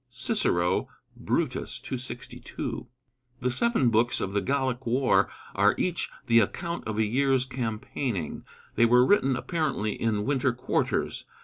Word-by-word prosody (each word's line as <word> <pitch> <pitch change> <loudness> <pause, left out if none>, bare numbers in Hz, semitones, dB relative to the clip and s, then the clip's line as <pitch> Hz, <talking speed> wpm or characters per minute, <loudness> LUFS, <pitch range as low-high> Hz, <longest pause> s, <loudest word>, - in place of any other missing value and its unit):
(Cicero, 120 - 0 0.3
Brutus, - - -2
262.) 125 -1 -6 0.5
The 125 0 0
seven 140 - +2
books 115 +3 +2
of 95 - -3
the 100 - +1
Gallic 130 +2 -1
War 130 +3 +3 0.2
are - - +4
each 175 -2 -1 0.2
the 115 0 +5
account 170 - -2
of 110 -1 -3
a 110 - +3
year's 130 +3 +2
campaigning. 115 - -3 0.3
They 115 - +4
were 125 +1 +6
written 135 -7 +3
apparently 140 - -1
in 105 -3 -1
winter 135 -3 +1
quarters. 125 +2 -1
125 Hz, 130 wpm, -27 LUFS, 115-135 Hz, 0.5 s, were